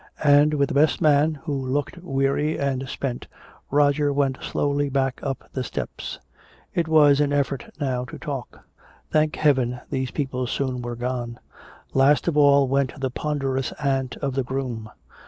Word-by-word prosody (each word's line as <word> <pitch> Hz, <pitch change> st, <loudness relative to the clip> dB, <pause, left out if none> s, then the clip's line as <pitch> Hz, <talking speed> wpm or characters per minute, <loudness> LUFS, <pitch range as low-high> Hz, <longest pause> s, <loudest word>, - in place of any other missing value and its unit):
And 145 Hz, +1 st, +5 dB
with 140 Hz, -1 st, +1 dB
the -, -, -3 dB
best 150 Hz, +2 st, +3 dB
man, 155 Hz, +1 st, +3 dB
who 155 Hz, -3 st, -3 dB
looked 140 Hz, +5 st, -2 dB
weary 140 Hz, -1 st, 0 dB
and 135 Hz, -2 st, -2 dB
spent, 130 Hz, -3 st, -4 dB, 0.4 s
Roger 145 Hz, 0 st, +3 dB
went 140 Hz, -2 st, 0 dB
slowly 145 Hz, 0 st, 0 dB
back 135 Hz, -1 st, 0 dB
up 135 Hz, -2 st, -4 dB
the 130 Hz, -, -2 dB
steps. -, -, -5 dB, 0.6 s
It 170 Hz, -2 st, 0 dB
was 150 Hz, -3 st, +5 dB
an 145 Hz, -1 st, +1 dB
effort 140 Hz, -2 st, -1 dB
now 130 Hz, -4 st, -1 dB
to -, -, -9 dB
talk. 140 Hz, -6 st, -6 dB, 0.5 s
Thank 155 Hz, 0 st, +2 dB
Heaven 130 Hz, -5 st, +2 dB
these 130 Hz, -1 st, -1 dB
people 130 Hz, -3 st, -2 dB
soon 130 Hz, -1 st, -2 dB
were 120 Hz, 0 st, -4 dB
gone. 120 Hz, 0 st, -4 dB, 0.5 s
Last 140 Hz, +4 st, +4 dB
of 170 Hz, -, +1 dB
all 140 Hz, -2 st, +5 dB
went 135 Hz, +1 st, 0 dB
the 130 Hz, -1 st, -2 dB
ponderous 135 Hz, -2 st, -2 dB
aunt 135 Hz, -3 st, -1 dB
of 135 Hz, -2 st, 0 dB
the 135 Hz, 0 st, 0 dB
groom. 125 Hz, -4 st, -4 dB
140 Hz, 160 wpm, -24 LUFS, 130-145 Hz, 0.6 s, And